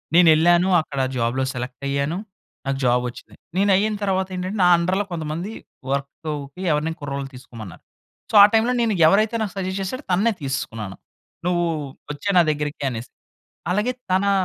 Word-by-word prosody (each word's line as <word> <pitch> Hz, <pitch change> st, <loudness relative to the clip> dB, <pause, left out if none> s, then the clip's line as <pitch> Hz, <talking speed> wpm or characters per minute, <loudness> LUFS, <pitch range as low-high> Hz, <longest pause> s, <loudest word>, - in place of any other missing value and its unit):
నేనెళ్ళాను. 175 Hz, +1 st, +6 dB
అక్కడ 140 Hz, -3 st, -6 dB, 0.2 s
జాబ్‌లో 120 Hz, +3 st, 0 dB
సెలెక్టయ్యాను. 140 Hz, +5 st, -2 dB, 0.5 s
నాకు 135 Hz, 0 st, 0 dB
జాబొచ్చింది. 125 Hz, 0 st, -1 dB, 0.2 s
నేనయ్యిన 200 Hz, +2 st, +3 dB
తర్వాతేంటంటే, 190 Hz, 0 st, -1 dB
నా -, -, +6 dB
అండర్‌లో 185 Hz, +4 st, 0 dB
కొంతమంది 165 Hz, +4 st, -4 dB, 0.4 s
వర్కూకి 140 Hz, +2 st, -4 dB
ఎవరినైనా 155 Hz, +2 st, -1 dB
కుర్రోళ్ళని 140 Hz, -1 st, -4 dB
తీసుకోమన్నారు. 115 Hz, -7 st, -11 dB, 0.5 s
సో, -, -, -2 dB
ఆ -, -, +11 dB
టైమ్‌లో 225 Hz, +3 st, +3 dB
నేను, 230 Hz, -2 st, +2 dB
ఎవరైతే 215 Hz, +6 st, +3 dB
నాకు 205 Hz, -4 st, -2 dB
సజెస్ట్ 190 Hz, 0 st, -2 dB
చేశాడో 255 Hz, +9 st, -4 dB
తననే 205 Hz, +6 st, +3 dB
తీసేసుకున్నాను. 115 Hz, -7 st, -4 dB, 0.5 s
నువ్వు 175 Hz, -1 st, +1 dB, 0.5 s
ఒచ్చేయి 200 Hz, +7 st, -2 dB
నా -, -, +8 dB
దగ్గరికి 150 Hz, 0 st, -4 dB
అనేసి. 120 Hz, 0 st, -7 dB, 0.6 s
అలాగే 210 Hz, +6 st, +1 dB, 0.2 s
తనా 195 Hz, +2 st, +3 dB
165 Hz, 135 wpm, -22 LUFS, 140-190 Hz, 0.6 s, ఆ